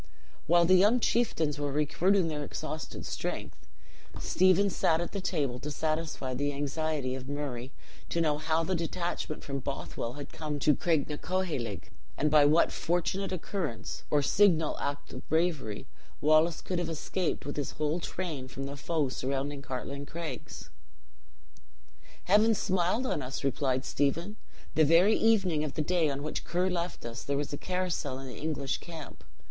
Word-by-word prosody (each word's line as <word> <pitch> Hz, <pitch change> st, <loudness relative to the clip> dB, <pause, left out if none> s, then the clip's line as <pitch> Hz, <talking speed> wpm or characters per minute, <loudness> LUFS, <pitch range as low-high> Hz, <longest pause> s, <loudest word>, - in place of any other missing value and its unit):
While 170 Hz, +1 st, +6 dB
the 185 Hz, -, +5 dB
young 205 Hz, +7 st, +6 dB
chieftains 160 Hz, -12 st, +1 dB
were 145 Hz, -1 st, -1 dB
recruiting 165 Hz, +6 st, +2 dB
their 150 Hz, -2 st, -2 dB
exhausted 155 Hz, +1 st, -5 dB
strength, -, -, -5 dB, 0.5 s
Stephen 185 Hz, +2 st, +4 dB
sat 160 Hz, -2 st, +2 dB
at 175 Hz, -, -3 dB
the 200 Hz, -, -3 dB
table 145 Hz, -9 st, -1 dB
to 150 Hz, -, -5 dB
satisfy 155 Hz, -3 st, -2 dB
the 145 Hz, +3 st, -1 dB
anxiety 145 Hz, -1 st, -1 dB
of 130 Hz, +1 st, -6 dB
Murray 135 Hz, -3 st, -4 dB, 0.4 s
to 170 Hz, -, 0 dB
know 150 Hz, -3 st, +2 dB
how 160 Hz, +1 st, +1 dB
the 185 Hz, -, -1 dB
detachment 170 Hz, -2 st, -2 dB
from 140 Hz, -1 st, -3 dB
Bothwell 130 Hz, -3 st, -4 dB
had 145 Hz, 0 st, -8 dB
come 150 Hz, -2 st, -3 dB
to 150 Hz, +1 st, +4 dB
Craignacoheilg, 150 Hz, -, -1 dB, 0.3 s
and 150 Hz, 0 st, +2 dB
by 150 Hz, -1 st, +7 dB
what 155 Hz, +4 st, +5 dB
fortunate 180 Hz, +3 st, -1 dB
occurrence, 175 Hz, -, -3 dB
or 145 Hz, -1 st, +3 dB
signal 165 Hz, -2 st, +4 dB
act 145 Hz, 0 st, -4 dB
of -, -, -9 dB
bravery, 160 Hz, -10 st, 0 dB, 0.3 s
Wallace 155 Hz, +2 st, +4 dB
could 180 Hz, -2 st, -2 dB
have 175 Hz, -, -2 dB
escaped 165 Hz, +1 st, -2 dB
with 145 Hz, -, -4 dB
his 145 Hz, -2 st, -3 dB
whole 155 Hz, +2 st, 0 dB
train 165 Hz, -7 st, -4 dB
from 135 Hz, +2 st, -6 dB
the 140 Hz, +1 st, -5 dB
foe 150 Hz, +1 st, 0 dB
surrounding 140 Hz, +2 st, -2 dB
Cartlane 140 Hz, +1 st, -5 dB
Craigs. 170 Hz, -1 st, -6 dB, 1.5 s
"Heaven 215 Hz, +4 st, +5 dB
smiled 190 Hz, +6 st, +1 dB
on 155 Hz, -, 0 dB
us!" 130 Hz, +1 st, -5 dB
replied 135 Hz, -1 st, 0 dB
Stephen. 170 Hz, +9 st, 0 dB, 0.4 s
"The 155 Hz, -, +5 dB
very 170 Hz, +8 st, +6 dB
evening 195 Hz, -9 st, +3 dB
of 150 Hz, -, -4 dB
the 155 Hz, -, 0 dB
day 170 Hz, -1 st, +2 dB
on 140 Hz, 0 st, -3 dB
which 155 Hz, -, -3 dB
Ker 180 Hz, +2 st, 0 dB
left 175 Hz, -4 st, -3 dB
us 115 Hz, +1 st, -5 dB
there 140 Hz, 0 st, -1 dB
was 145 Hz, 0 st, -2 dB
a -, -, -2 dB
carousal 180 Hz, -7 st, -2 dB
in 135 Hz, -, -7 dB
the 125 Hz, -4 st, -8 dB
English 150 Hz, -3 st, -2 dB
camp. 165 Hz, -4 st, -9 dB
155 Hz, 165 wpm, -30 LUFS, 140-175 Hz, 1.5 s, by